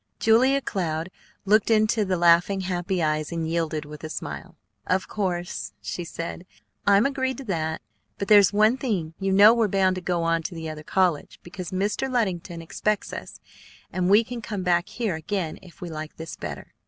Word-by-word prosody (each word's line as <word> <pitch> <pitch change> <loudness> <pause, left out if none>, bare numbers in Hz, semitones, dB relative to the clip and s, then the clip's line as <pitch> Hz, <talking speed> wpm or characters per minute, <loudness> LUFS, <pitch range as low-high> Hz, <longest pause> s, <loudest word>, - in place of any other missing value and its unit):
Julia 255 +5 +4
Cloud 170 -6 -2 0.3
looked 210 +2 +4
into 215 0 +3
the 190 -2 0
laughing, 175 +3 +4
happy 180 -1 -1
eyes, 155 0 0
and 165 -1 -2
yielded 160 -2 -1
with 150 +1 -10
a 155 - -5
smile. - - -6 0.3
"Of 185 +1 +1
course," 180 -4 -3
she 175 - -5
said, 170 0 -6
"that's 185 - -18
reasonable. - - -33
I'm 200 +2 +5
agreed 260 -2 -1
to 275 - -7
that. 160 -8 -2 0.4
But 200 - -3
there's 205 -2 +7
one 215 +4 +4
thing: 190 - -2
you 195 0 0
know 205 +3 +8
we're 230 -2 +2
bound 190 -1 +2
to - - -4
go 175 -1 -1
on 165 0 +1
to 170 +2 -6
the 160 -1 -5
other 155 -1 -7
college, 175 -2 0
because 180 0 -7
Mr. 205 +8 -1
Luddington 180 -8 -1
expects 210 +5 -2
us; - - -8 0.5
and 180 -1 0
we 210 +3 +6
can 240 0 -6
come 205 -3 -4
back 175 -1 +2
here 225 -6 -2
again 160 +1 -3
if 180 -3 -16
we 175 - -5
like 155 0 -6
this 160 0 -7
better." - - -7
185 Hz, 195 wpm, -25 LUFS, 165-210 Hz, 0.5 s, know